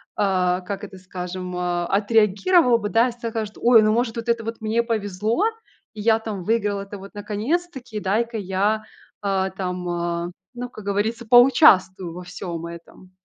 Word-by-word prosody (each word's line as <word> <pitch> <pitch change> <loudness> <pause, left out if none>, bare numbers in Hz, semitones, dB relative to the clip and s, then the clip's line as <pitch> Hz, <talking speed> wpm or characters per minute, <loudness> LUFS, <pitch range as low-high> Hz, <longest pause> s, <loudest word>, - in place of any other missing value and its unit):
а, 185 -3 +1
как 200 +3 -6
это 195 -2 -9
скажем, 180 0 -6
э, 175 -1 -1
отреагировал 225 - +3
бы 210 -1 -3
да 230 +3 +4
и - - -5
скажет, 225 -3 -5
ой, 235 -2 +6
ну, 215 - +3
может, 230 +1 0
вот 230 0 -5
это 235 -1 +1
вот 225 +1 -5
мне 220 +2 +1
повезло, 215 - -1 0.5
и 215 - -7
я 225 +1 +3
там 210 -5 -5
выиграла 205 -1 0
это 200 +1 -9
вот 195 +1 -12
наконец-таки! 245 - -3
Дай-ка 225 +4 -1
я, 205 +3 0 0.4
а, 190 -1 0
там, 180 -1 -4
а, 170 0 -2 0.3
ну 245 0 -5
как 215 - -11
говорится, 215 +4 -1
поучаствую 225 - +5
во 180 +1 -8
всём 175 -2 -6
этом. 170 +2 -12
205 Hz, 165 wpm, -23 LUFS, 185-230 Hz, 0.5 s, ой